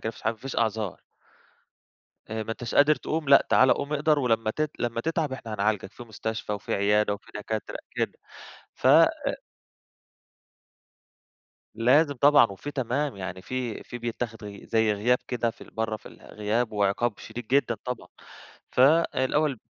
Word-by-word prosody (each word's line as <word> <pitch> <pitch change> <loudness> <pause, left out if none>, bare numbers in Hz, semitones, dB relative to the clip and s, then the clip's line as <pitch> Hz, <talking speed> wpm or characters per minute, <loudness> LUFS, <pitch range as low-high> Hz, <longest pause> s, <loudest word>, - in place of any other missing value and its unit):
كده، - - -2
ما 115 - -4
فيش - - -15
ح - - -6
مافيش 115 +4 -5
أعذار. 110 -4 -1 1.3
آآ 110 0 -2
ما 110 - -7
أنتش 120 0 -6
قادر 145 +2 +6
تقوم 155 -2 -3
لأ، 140 - +7
تعالَي 130 0 +6
قوم 140 +1 -3
اقدر، 150 +1 +2
ولمّا 115 -4 +1
تت 155 +5 -2
لما 115 -1 -1
تتعب 160 0 -1
إحنا 115 -4 -6
هنعالجك 105 -1 -1
في - - -11
مستشفى، 110 -1 -4
وفي 105 - -3
عيادة، 105 +1 +2
وفي 100 - -14
دكاترة 105 +1 -4
كده - - -3 0.6
فَ - - -10
آآ - - +7 2.7
لازم 140 +6 +4
طبعًا 145 0 +6
وفي 105 +8 -7
تمام، 135 -1 -2
يعني 95 -1 -6
في 125 0 -4
في 120 - -8
بيتاخد 115 -2 -5
غ 100 -1 -8
زي 110 -1 +2
غياب 120 +5 +2
كده 120 -2 0
في - - -21
ال - - -12
برّه 110 -1 -2
في - - -20
الغياب 110 +2 -3
وعقاب 105 +2 0
شديد 120 -1 -8
جدًا 130 -1 +2
طبعًا. 125 -2 -5 0.6
فالأول 140 -1 +3
115 Hz, 160 wpm, -26 LUFS, 110-135 Hz, 2.7 s, لأ